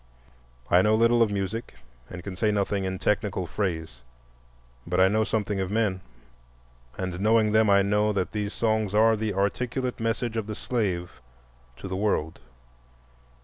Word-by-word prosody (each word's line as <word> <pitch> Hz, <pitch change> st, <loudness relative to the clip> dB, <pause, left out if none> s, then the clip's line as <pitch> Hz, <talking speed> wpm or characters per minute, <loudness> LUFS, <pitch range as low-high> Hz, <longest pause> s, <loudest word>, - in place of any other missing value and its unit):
I 90 Hz, -, +6 dB
know 105 Hz, +2 st, +3 dB
little 115 Hz, +1 st, +4 dB
of 115 Hz, -, +4 dB
music 100 Hz, -, -4 dB, 0.3 s
and 90 Hz, -1 st, -8 dB
can 95 Hz, -1 st, -6 dB
say 105 Hz, +3 st, +1 dB
nothing 100 Hz, -1 st, 0 dB
in 95 Hz, 0 st, -3 dB
technical 100 Hz, -2 st, -1 dB
phrase, 80 Hz, -, -3 dB, 0.9 s
but 90 Hz, +1 st, 0 dB
I 95 Hz, -, +6 dB
know 110 Hz, +3 st, +2 dB
something 105 Hz, -3 st, -1 dB
of 95 Hz, -1 st, -2 dB
men, 105 Hz, -3 st, 0 dB, 1.0 s
and 95 Hz, -1 st, -4 dB
knowing 110 Hz, 0 st, +3 dB
them, 110 Hz, 0 st, +4 dB
I 100 Hz, 0 st, +5 dB
know 105 Hz, +2 st, +2 dB
that 95 Hz, -3 st, -2 dB
these 105 Hz, -1 st, -3 dB
songs 110 Hz, -3 st, 0 dB
are 110 Hz, +1 st, +5 dB
the 105 Hz, -2 st, -2 dB
articulate 125 Hz, +6 st, -1 dB
message 115 Hz, 0 st, -2 dB
of 110 Hz, -2 st, -2 dB
the 110 Hz, -, -4 dB
slave 95 Hz, -, -3 dB, 0.6 s
to 95 Hz, -, -7 dB
the 95 Hz, -, -4 dB
world. 95 Hz, -6 st, -1 dB
105 Hz, 160 wpm, -26 LUFS, 95-110 Hz, 1.0 s, I